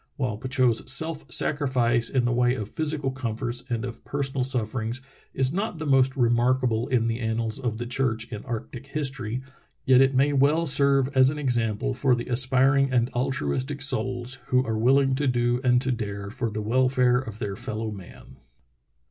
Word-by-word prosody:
While 125 -6 -2
Petitot's 130 -1 +1
self 160 +2 -1
sacrifice, 125 -5 +2
in 130 -3 +1
the 120 - +1
way 125 +1 +2
of 105 -5 -5
physical 150 +1 -2
comforts 120 -1 -3
and 120 0 -2
of 120 -2 -8
personal 135 -2 -2
sufferings, 120 -1 -2 0.4
is 130 +1 +2
not 195 -1 -2
the 155 - -5
most 135 -1 +3
remarkable 120 -1 +1
in 120 -3 +1
the 115 +1 -1
annals 110 -1 -2
of 120 -4 -3
the 120 - -4
church 120 -3 -1
in 105 -2 -6
arctic 120 +3 -6
history, 135 -5 -3 0.4
yet 130 0 +6
it 135 0 +3
may 140 +3 +3
well 145 +4 +3
serve 140 -2 +3
as 130 0 +5
an 150 - -4
example 125 -2 -1
for 130 0 +2
the 120 - -6
aspiring 135 +2 +3
and 125 0 +1
altruistic 130 - -2
souls 125 0 -1
who 130 0 +2
are 110 - -2
willing 135 +4 +3
to 140 +2 0
do 120 0 +1
and 125 0 +3
to 130 - 0
dare 100 -4 -4
for 120 -1 -2
the 105 0 -4
welfare 125 +2 +2
of 110 -5 -7
their 100 -2 -4
fellow 110 +2 -4
man. 95 -4 -12
125 Hz, 180 wpm, -25 LUFS, 115-135 Hz, 0.4 s, yet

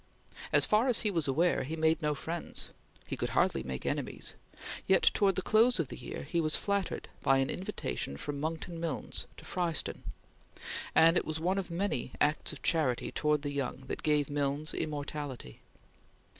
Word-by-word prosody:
As - - +7
far 215 +4 +3
as 250 - +7
he 210 - +1
was 165 -6 0
aware, 165 +6 +2
he 155 +5 -3
made 160 +1 +2
no 150 -1 +1
friends; 165 +3 -3 0.3
he - - -4
could - - -2
hardly - - +3
make 65 -1 -5
enemies; - - -1 0.5
yet 190 - +4
towards 195 -2 +4
the 190 - -1
close 230 +3 +4
of 155 -6 -1
the - - -6
year - - -6
he 170 +4 0
was 155 -1 +2
flattered 200 -2 -1
by 135 - +4
an 135 0 +1
invitation 180 - -3
from 145 - -4
Monckton 165 +2 -3
Milnes 165 -5 -4
to - - -12
Fryston, 175 -3 -1 0.9
and 165 +2 +7
it - - +1
was 155 0 -2
one 185 +4 +1
of 190 - -5
many 170 -8 -2
acts 150 +1 +2
of 145 -4 -10
charity 150 -8 +1
towards 150 -1 +1
the 145 - -2
young 140 -2 -2
that 130 - -5
gave 150 -2 +2
Milnes 145 +1 -1
immortality. 145 - -5
155 Hz, 180 wpm, -31 LUFS, 145-175 Hz, 0.9 s, As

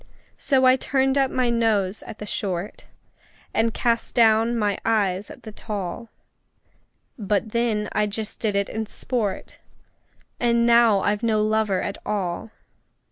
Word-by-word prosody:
So 265 -2 +2
I 255 0 +6
turned 265 0 +1
up 270 -1 +2
my 250 -2 0
nose 215 -4 +1
at 220 - -9
the 210 - -7
short, 190 -2 -4 0.7
And 225 +1 +2
cast 230 0 -1
down 230 0 +4
my 205 -3 0
eyes 205 -3 0
at - - -12
the 220 - -8
tall; 205 0 -5 1.1
But 205 +1 -1
then 225 -3 0
I 210 0 +1
just 210 +1 -5
did 210 -3 -1
it 200 0 +1
in 220 0 -4
sport 215 -4 -4 0.8
And 235 -1 +2
now 235 -4 +5
I've 205 +2 0
no 220 -2 +1
lover 215 -3 +1
at 200 - -4
all! 195 -1 -3
220 Hz, 145 wpm, -23 LUFS, 205-235 Hz, 1.1 s, I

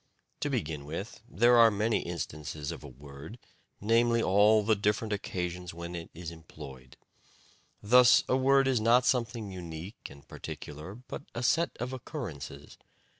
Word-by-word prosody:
To - - -1
begin 75 -2 -3
with, 90 +9 -6
there 120 +1 +4
are 115 -1 +8
many 110 +2 +1
instances 75 -2 -5
of 85 - -8
a - - -8
word, 70 - -11 0.4
namely 115 +2 +3
all 105 +1 +4
the 110 +1 +3
different 105 +2 0
occasions 90 -3 -4
when 85 +1 -6
it 85 -1 -6
is 85 0 -6
employed. 70 -5 -12 0.9
Thus 125 +3 +7
a - - +2
word 135 +1 +4
is 130 -4 +2
not 120 +3 +4
something 115 -5 0
unique 85 +2 -8
and 70 0 -15
particular, 75 +7 -8
but 125 +3 -8
a 120 - -3
set 165 +7 +1
of 125 +2 -3
occurrences. 120 - -7
100 Hz, 150 wpm, -30 LUFS, 80-115 Hz, 0.9 s, are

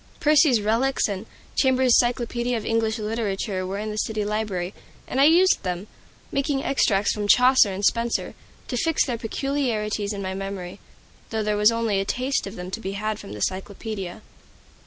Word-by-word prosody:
"Percy's 300 -5 +5
Reliques" 230 +6 +1
and 200 +1 -5 0.3
"Chambers' 260 -2 +4
Cyclopoedia 240 0 0
of 220 - -6
English 225 0 0
Literature" 210 -3 -2
were 195 +1 -3
in 215 +1 -3
the 210 - -6
city 215 -1 -1
library, 205 -3 -2 0.3
and 265 - 0
I - - +7
used 355 +5 +5
them, 180 0 -3 0.5
making 275 0 0
extracts 205 -7 +2
from 210 -1 -2
Chaucer 250 -2 +6
and 195 +2 -2
Spenser, 235 +1 0 0.3
to 245 - -3
fix 325 +5 +2
their 240 -4 -3
peculiarities 225 -4 -1
in 200 -1 -4
my 190 0 -3
memory, 195 -1 -6 0.5
though 220 -1 -1
there 210 0 0
was 210 +2 +5
only 230 -3 0
a 195 - -1
taste 255 +2 -1
of 200 - -8
them 180 +1 -7
to 225 - -4
be 195 -3 -4
had 215 +1 -3
from 100 - -9
the 105 - -8
Cyclopaedia. 195 - -4
215 Hz, 180 wpm, -24 LUFS, 200-245 Hz, 0.5 s, I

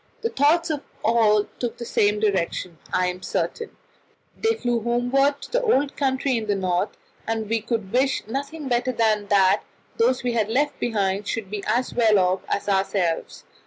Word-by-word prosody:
The 460 - 0
thoughts 320 +4 +3
of 295 -2 -2 0.2
all 215 -2 +4
took 240 -2 -3
the 235 - -6
same 210 -2 +2
direction, 185 -5 -1
I 185 - +2
am 180 0 -3
certain 455 - -3 0.6
they 450 0 +1
flew 240 - -1
homeward 245 +5 +1
to - - -10
the - - +2
old 290 - +1
country 265 -2 0
in 220 -1 -4
the 205 - +1
North, 185 0 -1 0.3
and 225 -1 -2
we 225 +1 0
could 220 -4 -3
wish 265 +2 +1
nothing 280 +6 -5
better 245 0 +1
than 215 -3 +1
that 195 -2 +4 0.4
those 250 +3 +2
we 245 -1 0
had 220 -2 0
left 285 +5 0
behind 200 -3 -1
should 210 -4 -3
be 205 -1 -4
as 240 +4 0
well 225 -3 +4
off 185 0 +2
as 200 - -2
ourselves. 190 -4 0
225 Hz, 180 wpm, -23 LUFS, 200-265 Hz, 0.6 s, all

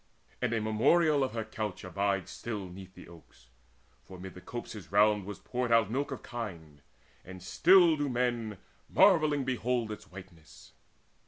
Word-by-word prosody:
And 125 -2 0
a 115 - +1
memorial 140 +8 +3
of 130 - -2
her 115 -1 -2
couch 110 -3 -5
abides 100 0 -1
Still 105 -1 -5
'neath 95 +1 -12
the 90 - -12
oaks; 70 -7 -18 0.5
for 95 - -12
mid 95 0 -8
the 90 - -12
copses 105 -7 -8
round 105 0 +3
Was 105 0 -7
poured 125 -1 -3
out 115 -2 +4
milk 140 +4 -1
of 135 - -7
kine; 85 -11 -7 0.4
and 95 -1 -11
still 175 - +5
do 145 -1 -2
men 120 -4 -1 0.3
Marvelling 155 -7 +4
behold 125 -3 -1
its 105 - -9
whiteness. 85 -7 -14
110 Hz, 160 wpm, -30 LUFS, 95-125 Hz, 0.5 s, still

